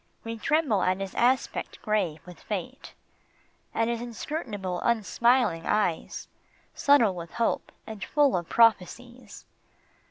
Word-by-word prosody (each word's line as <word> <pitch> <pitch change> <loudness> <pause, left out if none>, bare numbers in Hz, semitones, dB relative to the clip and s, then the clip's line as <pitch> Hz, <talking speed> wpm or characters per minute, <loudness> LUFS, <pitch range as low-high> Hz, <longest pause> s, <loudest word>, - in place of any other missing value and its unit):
We 230 0 -5
tremble 300 - +1
at 185 +1 +1
his 195 -1 -5
aspect 250 +1 0
grave 190 -8 -1
with 180 -1 -12
fate, 215 +6 -6 0.8
At 225 - 0
his 235 -1 -2
inscrutable, 220 - -4
unsmiling 235 -4 +2
eyes, 185 -6 -1 0.5
Subtle 260 -9 +4
with 170 -2 -8
hope 235 -1 -1
and 215 -3 -7
full 290 -3 +2
of 175 -2 -3
prophecies. 230 +1 +1
225 Hz, 120 wpm, -27 LUFS, 185-245 Hz, 0.8 s, Subtle